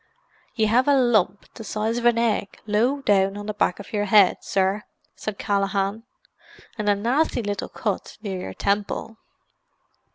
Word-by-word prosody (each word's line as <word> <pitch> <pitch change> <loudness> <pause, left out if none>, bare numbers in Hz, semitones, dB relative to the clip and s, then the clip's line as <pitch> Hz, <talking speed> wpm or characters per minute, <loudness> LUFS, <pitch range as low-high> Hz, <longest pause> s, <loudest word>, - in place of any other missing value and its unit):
"Ye 220 - +2
have 240 +5 +3
a 285 - +5
lump 215 -7 +2
the 225 - -9
size 220 +2 -2
of 240 - -5
an 240 -1 +4
egg 225 -3 0
low 240 +7 +1
down 195 -2 +2
on 205 - -6
the 215 - -3
back 200 -2 0
of 200 - -11
your 205 -1 0
head, 205 -2 +5
sir," 195 +2 0 0.3
said 215 -2 -5
Callaghan. 200 +2 -1 0.7
"And 210 -2 -1
a 205 - +4
nasty 240 +5 0
little 205 -1 -3
cut 205 -4 -4
near 190 -3 -4
your 95 - -7
temple." 205 +2 -2
210 Hz, 165 wpm, -24 LUFS, 200-230 Hz, 0.7 s, a